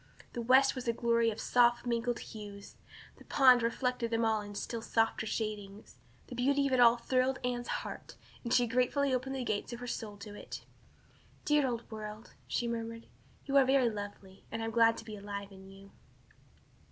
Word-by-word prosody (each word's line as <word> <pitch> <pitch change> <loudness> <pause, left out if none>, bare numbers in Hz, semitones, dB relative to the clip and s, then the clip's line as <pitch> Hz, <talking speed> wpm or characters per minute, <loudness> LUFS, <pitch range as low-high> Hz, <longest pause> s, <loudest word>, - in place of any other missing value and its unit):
The 240 - -3
west 260 +3 +5
was 255 -2 -6
a 235 - +2
glory 235 -1 +2
of 220 - -5
soft 240 0 +3
mingled 240 0 0
hues, 205 -2 -9 0.4
and - - -25
the - - -15
pond 255 -3 +6
reflected 235 0 -1
them 230 0 +1
all 220 -1 +2
in 205 0 -9
still 230 +3 -4
softer 225 0 0
shadings. 210 -2 -5 0.3
The - - -10
beauty 280 +3 +2
of 275 - 0
it 255 - +3
all 240 0 +7
thrilled 255 +2 +1
Anne's 245 0 -2
heart, - - -5 0.3
and 235 - -4
she 245 - +4
gratefully 255 +4 +1
opened 260 +1 -1
the 260 - -2
gates 215 +1 -2
of 235 - -6
her 245 - -6
soul 220 -4 -5
to 205 +1 -9
it. 205 - -9 0.8
"Dear 295 -2 +3
old 235 -2 -3
world," 215 +1 -8
she 240 - -1
murmured, 230 0 -4 0.4
"you 275 - -2
are 275 - +8
very 260 -2 +3
lovely, 205 -2 -8
and 225 0 -3
I - - -1
am 225 - -3
glad 230 0 +4
to - - -9
be 215 -1 -7
alive 200 0 -6
in 190 0 -13
you." 195 0 -14
235 Hz, 200 wpm, -32 LUFS, 215-250 Hz, 0.8 s, are